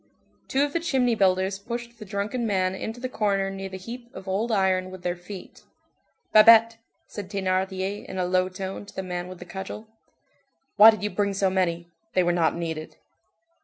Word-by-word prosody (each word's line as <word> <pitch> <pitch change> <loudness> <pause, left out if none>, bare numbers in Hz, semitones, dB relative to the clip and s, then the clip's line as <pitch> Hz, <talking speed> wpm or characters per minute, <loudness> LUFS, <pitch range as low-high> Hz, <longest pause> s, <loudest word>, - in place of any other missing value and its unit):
Two 270 +2 +2
of 290 0 -2
the 335 - +1
"chimney 265 -7 +1
builders" 190 -1 +2
pushed 235 +2 -6
the 215 - -8
drunken 210 +4 -2
man 185 -2 +1
into 220 +5 -5
the 255 - -3
corner 200 -5 0
near 195 0 -6
the 190 - -7
heap 235 +5 -9
of 190 - -9
old 205 +5 -1
iron 190 -3 +2
with 185 -1 -10
their 175 0 -1
feet. 180 +2 -10 0.7
"Babet," 225 +1 +8 0.3
said 200 -3 -8
Thénardier 190 0 -1
in - - -7
a 180 - 0
low 185 +1 +1
tone 190 +1 -6
to - - -14
the 190 - -3
man 180 -1 -4
with 185 0 -9
the 180 - -10
cudgel, 190 +4 -7 0.9
"why 215 +2 +10
did 215 -2 +1
you 210 - -1
bring 200 -1 0
so 195 -1 +2
many; 170 -2 0 0.3
they 185 - +4
were 175 - +2
not 165 -2 +2
needed." 160 -2 -5
195 Hz, 195 wpm, -25 LUFS, 185-220 Hz, 0.9 s, why